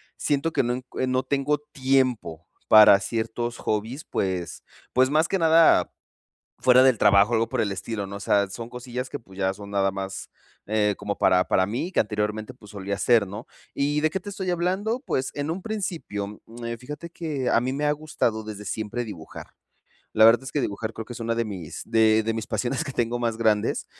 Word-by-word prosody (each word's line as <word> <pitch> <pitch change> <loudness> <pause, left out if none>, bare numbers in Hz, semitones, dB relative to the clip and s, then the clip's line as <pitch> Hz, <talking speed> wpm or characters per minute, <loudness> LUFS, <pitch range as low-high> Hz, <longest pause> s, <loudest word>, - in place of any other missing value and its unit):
siento 145 +3 -1
que - - +3
no 120 +1 0
encu 125 0 -7
no 130 0 +1
tengo 140 +1 0
tiempo 130 - -1 0.2
para 105 -2 +8
ciertos 115 +2 -3
hobbies. 110 +8 -3
Pues 95 -3 -3 0.3
pues 130 +1 +4
más 155 +3 +3
que 195 - 0
nada 165 0 +5 0.7
fuera 130 0 +6
del 130 -3 +5
trabajo 100 +3 +5
o - - +3
algo 115 0 +1
por - - -1
el 105 - 0
estilo, 100 +1 -4
no. 100 - -7
O - - -8
sea, 100 0 +2
son 115 +4 -7
cosillas 125 +1 -6
que - - -4
pues, 95 -4 -17
ya 95 -1 0
son 100 +1 -10
nada 95 -1 +2
más, 95 0 -6 0.4
eh, 105 -1 +1
como 105 0 -4
para 90 0 +4
para 95 - +2
mí 125 - -3
que - - -3
anteriormente 105 +2 -2
pues, 105 -4 -16
solía 100 0 -4
hacer, 110 0 +3
¿no? 105 +5 -8 0.3
Y 145 +1 0
de 155 +1 +2
qué 190 - -3
te 205 - -8
estoy 190 -1 -5
hablando? 190 +7 -1
Pues, 130 - -1
en 145 +2 -3
un 175 +4 -3
principio, 160 - -4
em, 115 0 -6
fíjate 150 +7 -8
que 150 -7 -3
a - - +4
mí 130 +2 -2
me 145 +2 -2
ha - - +3
gustado 145 -7 -2
desde 105 -1 -7
siempre 110 +4 -3
dibujar. 85 -8 -9 0.7
La 110 0 +6
verdad 115 +2 +6
es 130 - -7
que 150 - -1
dibujar 110 -2 -3
creo 115 0 -7
que 120 - -8
es - - -9
una 115 0 -1
de 115 0 0
mis 90 -6 -7
de 110 0 +3
mis 110 -1 -4
pasiones 130 +1 -1
que 140 - -6
tengo 120 -1 -1
más 115 -2 -1
grandes, 110 -2 +1
115 Hz, 210 wpm, -25 LUFS, 105-135 Hz, 0.7 s, para